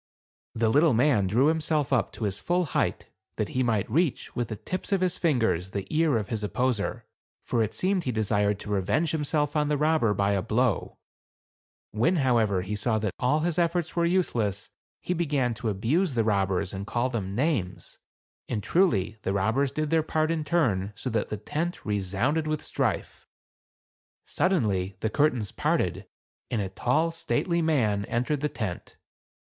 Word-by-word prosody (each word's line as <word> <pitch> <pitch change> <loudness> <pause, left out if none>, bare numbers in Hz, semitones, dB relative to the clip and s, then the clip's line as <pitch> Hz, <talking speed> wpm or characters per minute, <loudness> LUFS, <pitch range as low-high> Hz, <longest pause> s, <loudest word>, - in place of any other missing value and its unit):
The 115 -1 +2
little 145 +2 +4
man 120 -6 +3
drew 120 +8 +3
himself 155 -3 +1
up 125 - +1
to - - -6
his 100 -2 -2
full 175 +1 +1
height, 140 - -1 0.3
that - - -2
he 130 - -1
might 110 -5 +1
reach, 155 +4 0
with 120 -1 -1
the 110 - -5
tips 185 - -5
of 195 -2 +2
his 180 -1 -1
lingers, 115 - +1
the 100 -1 -3
ear 155 -5 +3
of 105 -2 -4
his 110 -2 -2
opposer; 125 0 -1 0.4
for 120 - 0
it 110 -1 -1
seemed 185 -1 +1
he 125 - 0
desired 105 -2 +1
to 105 - -6
revenge 105 - +1
himself 150 -1 0
on 150 -1 +2
the 150 0 +1
robber 150 -8 +2
by 100 0 +1
a 100 -2 +1
blow; 120 +5 0 0.9
when, 120 - +2
however, 115 - +2
he 105 +3 -3
saw 110 +2 0
that 105 -3 -2
all 145 +5 +2
his 170 +1 0
efforts 170 -1 0
were 170 - +2
useless, 115 - 0 0.3
he 180 - -1
began 145 -8 0
to 115 0 -3
abuse 130 - 0
the 115 - +2
robbers, 100 -3 0
and 100 +1 -5
call 120 +2 0
them 100 -5 -3
names; 120 - -2 0.5
and, 105 - -2
truly, 110 - +2
the 95 - -1
robbers 110 +8 +1
did 155 +1 -2
their 165 -1 +4
part 155 0 0
in 160 -2 -1
turn, 110 - +1
so 125 +4 -4
that 110 -1 -1
the 105 - -3
tent 160 - -4
resounded 105 - 0
with 155 -1 -2
strife. - - -2 1.0
Sud 185 - 0
denly, 95 - 0
the 110 - -1
curtains 125 -7 +1
parted - - -1 0.4
and 115 - -1
a 100 -2 -2
tall, 125 - +1
stately 165 +1 0
man 115 -11 +1
entered 125 +7 -1
the 150 +2 -1
tent. 105 -10 -5
125 Hz, 180 wpm, -27 LUFS, 105-155 Hz, 1.0 s, little